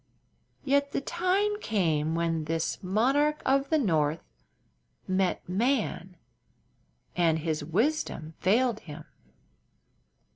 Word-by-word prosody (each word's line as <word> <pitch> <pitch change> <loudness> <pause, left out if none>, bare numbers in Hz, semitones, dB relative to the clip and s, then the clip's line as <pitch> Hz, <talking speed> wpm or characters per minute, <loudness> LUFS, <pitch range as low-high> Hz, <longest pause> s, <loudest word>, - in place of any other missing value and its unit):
Yet 280 0 +1
the - - 0
time 380 +7 0
came 160 -7 0
when 165 -2 -1
this 165 +1 -2
monarch 270 +11 +2
of 275 +1 +2
the 315 - +3
north 160 - +1 0.8
met 185 0 0
man, 195 -3 -1 1.0
and 165 -2 +3
his 155 -1 -2
wisdom 165 - -1
failed 225 +4 +2
him. 150 -4 -10
190 Hz, 100 wpm, -28 LUFS, -, 1.0 s, the